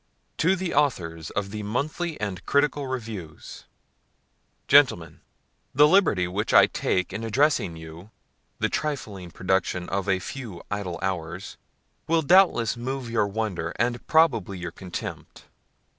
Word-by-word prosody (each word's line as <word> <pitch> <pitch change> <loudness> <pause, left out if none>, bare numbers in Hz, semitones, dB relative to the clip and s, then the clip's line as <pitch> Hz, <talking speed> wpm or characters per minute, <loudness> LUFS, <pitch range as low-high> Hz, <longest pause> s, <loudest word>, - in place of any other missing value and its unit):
TO 185 +4 +2
THE 185 -2 -3
AUTHORS 85 - 0
OF 100 -1 -3
THE 105 0 -5
MONTHLY 150 +10 -3
AND 95 -4 -4
CRITICAL 145 -1 +1
REVIEWS. 110 -11 -7 1.0
GENTLEMEN, 130 - +4 0.5
The 145 +2 +7
liberty 150 - +3
which 100 +4 -1
I - - +9
take 90 0 -1
in 110 +3 -4
addressing 115 - +1
to - - -10
you 80 +6 -11 0.5
the - - +1
trifling 110 - -4
production 90 0 -1
of 100 0 -2
a 95 - +3
few 105 -2 -7
idle 100 -4 -3
hours, 90 -1 -4 0.5
will 165 0 +2
doubtless 165 - +4
move 125 0 -4
your 110 -3 +2
wonder, 100 -5 -3
and 120 +1 -1
probably 115 - +3
your 90 -1 -5
contempt. 90 0 -8
105 Hz, 135 wpm, -25 LUFS, 90-140 Hz, 1.0 s, I